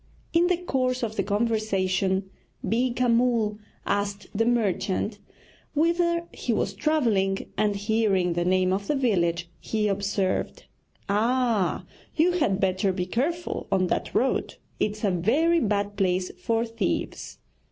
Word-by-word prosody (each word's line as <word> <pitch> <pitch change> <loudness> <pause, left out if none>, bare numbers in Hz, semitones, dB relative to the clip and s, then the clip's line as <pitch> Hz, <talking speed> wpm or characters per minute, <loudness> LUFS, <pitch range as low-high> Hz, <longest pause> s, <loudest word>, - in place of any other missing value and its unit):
In 340 +1 +4
the 360 -1 +2
course 255 -7 -1
of 220 -1 -2
the 200 - +1
conversation 195 -3 0 0.4
Beeka 245 +2 +1
Mull 230 -3 +2 0.3
asked 200 0 -1
the 225 +3 +1
merchant 210 -2 0 0.6
whither 340 +2 +2
he 245 - -3
was 200 -2 0
travelling, 205 -6 +1
and 210 -1 +1
hearing 200 -4 +1
the 175 +1 0
name 185 +1 +2
of 200 +1 -2
the 295 - +1
village, 175 -10 +1
he 215 -1 -1
observed: 200 -1 -1 0.4
'Ah, 225 -1 +1 0.3
you 335 +3 +4
had 280 - +1
better 190 +1 +1
be 180 -1 -2
careful 305 - -2
on 190 -1 +3
that - - -2
road 260 - +1 0.2
it's 215 +1 -1
a 200 - +3
very 280 - +2
bad 205 -4 0
place 185 -2 +1
for 230 0 0
thieves.' 230 0 -3
210 Hz, 135 wpm, -26 LUFS, 195-245 Hz, 0.6 s, In